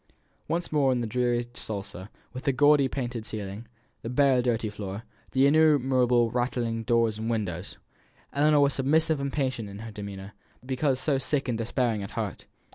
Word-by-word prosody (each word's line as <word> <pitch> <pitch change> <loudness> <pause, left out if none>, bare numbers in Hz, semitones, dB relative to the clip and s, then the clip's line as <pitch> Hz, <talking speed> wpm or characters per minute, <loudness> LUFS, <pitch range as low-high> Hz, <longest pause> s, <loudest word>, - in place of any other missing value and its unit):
Once 170 +1 -2
more 140 -3 +3
in 125 - +1
the 120 - -1
dreary 120 +1 0
sala, 100 -3 -6 0.2
with 130 - -7
the 140 - +3
gaudy 145 +1 +4
painted 125 -4 -4
ceiling, 105 +1 -6 0.3
the 115 - -5
bare 130 0 +3
dirty 115 -3 0
floor, 105 0 -6 0.3
the 135 +1 +4
innumerable 130 -6 +4
rattling 120 -2 -1
doors 115 -2 +1
and 110 +1 -3
windows! 100 -5 -3 0.6
Ellinor 150 +1 +4
was 140 -1 +3
submissive 155 +3 +2
and 140 0 -2
patient 130 -7 -2
in 105 +2 -8
demeanour, 100 -1 -7 0.3
because 130 0 0
so 140 -1 +1
sick 135 +1 -1
and 115 -2 -1
despairing 115 -1 0
at 100 - -6
heart. - - -4
125 Hz, 165 wpm, -27 LUFS, 110-135 Hz, 0.6 s, gaudy